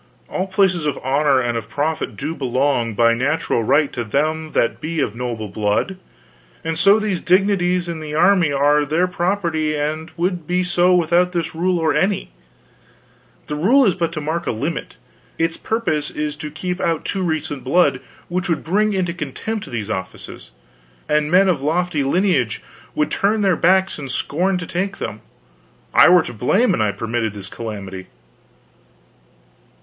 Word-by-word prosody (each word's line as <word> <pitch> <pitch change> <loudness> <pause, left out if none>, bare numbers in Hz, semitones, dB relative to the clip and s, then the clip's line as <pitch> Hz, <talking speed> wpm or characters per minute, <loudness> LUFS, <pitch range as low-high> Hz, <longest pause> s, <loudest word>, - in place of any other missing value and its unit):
All 185 - -2
places 190 -3 +2
of 145 - -1
honor 140 +1 +2
and 120 -2 -1
of 115 -2 -4
profit 155 +2 -2
do 150 +3 -3
belong, 130 -4 0
by 115 +1 +4
natural 130 0 0
right, 145 +6 +2
to 120 - -3
them 155 +7 -1
that 115 - 0
be 160 +1 -3
of 110 - 0
noble 120 -3 -4
blood, 105 - -1 0.7
and 165 0 -2
so 200 +3 +6
these 210 -5 -2
dignities 180 -1 +2
in 170 -2 -4
the 150 -1 -6
army 180 -2 +4
are 145 +1 +3
their 160 +5 +1
property 170 -4 -1
and 155 +2 -3
would 175 -2 -2
be 180 +1 +1
so 180 0 +3
without 175 +1 +2
this 170 -3 -2
or 170 -1 +1
any 195 0 +2
rule. - - -15 1.2
The 150 - -4
rule 240 - +4
is 195 - +3
but 170 -2 -2
to 155 - -4
mark 160 +3 -3
a - - +1
limit. 145 +9 -4 0.4
Its 165 0 0
purpose 220 -10 -1
is 150 0 -3
to 150 0 -6
keep 180 +4 -4
out 165 -2 -1
too 195 - -2
recent 155 -5 -2
blood, 135 -1 +2 0.3
which 180 +1 -2
would 165 - 0
bring 210 +5 +1
into 180 -3 -1
contempt 185 - -5
these 110 -3 -4
offices, 95 -2 -7 0.6
and 150 0 +1
men 185 +3 +5
of 170 -7 +1
lofty 160 0 0
lineage 140 - +1 0.3
would 150 - 0
turn 210 +1 +1
their 190 -3 +3
backs 190 +1 +2
and 140 -2 -6
scorn 180 +8 0
to 180 - -5
take 190 +4 -3
them. 105 - -5 0.7
I - - +7
were 180 -2 +6
to 120 - -7
blame 190 - +2
an - - 0
I 105 -1 +2
permitted 115 -1 -3
this 100 -1 -6
calamity. 100 -5 -7
160 Hz, 170 wpm, -20 LUFS, 140-180 Hz, 1.2 s, I